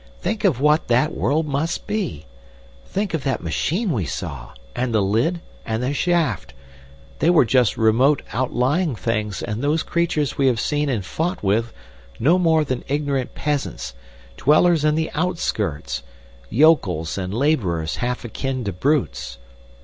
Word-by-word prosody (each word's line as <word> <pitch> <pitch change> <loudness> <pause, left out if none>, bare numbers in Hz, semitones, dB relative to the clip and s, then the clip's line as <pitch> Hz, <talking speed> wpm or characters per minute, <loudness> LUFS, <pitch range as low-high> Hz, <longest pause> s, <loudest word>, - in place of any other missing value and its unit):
Think 215 +2 -2
of 160 -11 +3
what 150 +3 +3
that 130 +7 +2
world 155 +3 +1
must 150 +3 -2
be! 185 - -3 0.6
Think 195 -3 -2
of 160 -4 -1
that 135 -9 -1
machine 170 - -1
we 105 - -1
saw, - - -6 0.2
and 120 -2 -1
the 105 - +4
lid 120 - +1 0.2
and 110 +1 -2
the 130 +3 0
shaft! 165 - 0 0.6
They 165 - +3
were 170 -7 +5
just 125 -1 +2
remote 120 +6 +3
outlying 130 +6 +1
things, 105 -3 -2
and 105 +2 -3
those 155 +3 +1
creatures 170 -5 -1
we 135 - +4
have 120 -4 +2
seen 150 +3 0
and 110 -8 -1
fought 165 - -2
with 110 +4 +1 0.5
no 165 +9 +4
more 160 -3 +3
than 130 -4 -3
ignorant 140 -2 -1
peasants, 135 - -2 0.4
dwellers 155 +3 +4
in 150 0 +3
the 160 0 -1
outskirts, 150 - -2 0.5
yokels 105 - +3
and 90 -1 -3
labourers 100 - 0
half 125 0 -2
akin 130 +3 -3
to 100 -3 -3
brutes. 75 - -1
135 Hz, 150 wpm, -22 LUFS, 110-160 Hz, 0.6 s, were